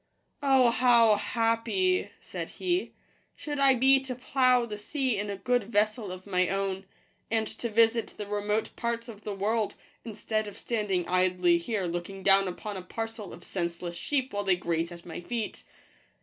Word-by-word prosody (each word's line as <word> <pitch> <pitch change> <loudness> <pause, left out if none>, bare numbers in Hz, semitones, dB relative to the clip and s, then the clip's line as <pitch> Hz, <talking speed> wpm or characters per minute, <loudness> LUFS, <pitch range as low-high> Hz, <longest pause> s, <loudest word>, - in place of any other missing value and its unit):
" - - -46
Oh, 265 -4 +5
how 235 -3 +5
happy," 230 - +1
said - - -6
he, 360 0 0 0.2
" - - -39
should 295 -2 -5
I 270 -1 +6
be 265 +2 +5
to 265 -1 -5
plough 255 -1 +3
the 210 -2 -6
sea 260 +2 -1
in 205 0 -3
a 200 - -3
good 245 +3 +1
vessel 215 -1 0
of 185 0 -8
my 185 -2 +1
own, 195 0 -2 0.4
and 225 -1 +1
to 235 +2 -5
visit 225 +1 +2
the 210 - -4
remote 210 +1 -1
parts 235 0 -2
of 215 -3 -10
the 205 - -4
world, 215 +2 0 0.3
instead 215 -1 -2
of 205 - -9
standing 205 -6 -1
idly 180 -1 +3
here 195 +2 -2
looking 175 +3 -5
down 195 0 +5
upon 200 +3 -5
a - - -5
parcel 225 +2 -6
of 175 - -11
senseless 170 -1 -4
sheep 265 +5 -1
while 205 0 -1
they 190 -2 +3
graze 170 -1 -2
at 170 0 -11
my 175 0 -7
feet. 225 +3 -4
215 Hz, 180 wpm, -28 LUFS, 190-240 Hz, 0.4 s, I